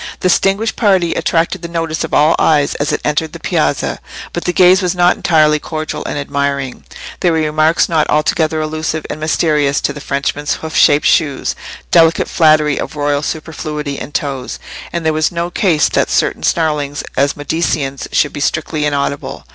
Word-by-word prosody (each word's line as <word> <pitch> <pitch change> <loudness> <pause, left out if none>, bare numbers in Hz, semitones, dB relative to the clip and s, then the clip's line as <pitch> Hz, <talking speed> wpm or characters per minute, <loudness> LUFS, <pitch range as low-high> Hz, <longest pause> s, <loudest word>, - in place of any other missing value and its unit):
The 185 - +2
distinguished 195 +5 +1
party 190 -6 +2
attracted 170 +2 0
the 170 - -5
notice 165 -2 -2
of - - -5
all 150 +2 +4
eyes 145 -3 +3
as 150 +2 -2
it - - -2
entered 150 +1 -1
the - - -8
piazza, - - -1 0.3
but 175 - -4
the 180 - +1
gaze 185 +2 +5
was 180 -1 -1
not 175 0 +4
entirely 155 -2 +3
cordial 155 0 -5
and - - -3
admiring; 140 -2 -3 0.3
there 175 - +2
were 165 - +1
remarks 155 +1 +2
not 160 -3 +1
altogether 155 +1 +1
allusive 155 0 -3
and - - -6
mysterious 150 -2 +1
to 140 - -1
the 145 - -9
Frenchman's 145 +1 -2
hoof 160 -1 -7
shaped 145 +1 +4
shoes—delicate 165 +2 +1
flattery 155 -3 +3
of - - -5
royal 145 -1 0
superfluity 150 -2 -4
in - - -7
toes; 135 -4 -3 0.3
and 170 -2 -3
there 160 - +2
was 155 0 +1
no 170 0 -3
care 180 -5 +1 0.2
that - - +1
certain - - 0
snarlings 150 -3 -1
at 140 +2 +1
"Mediceans" 145 -2 -2
should 145 - +1
be - - -5
strictly 155 +1 -1
inaudible. 140 -1 -3
155 Hz, 175 wpm, -15 LUFS, 145-165 Hz, 0.3 s, gaze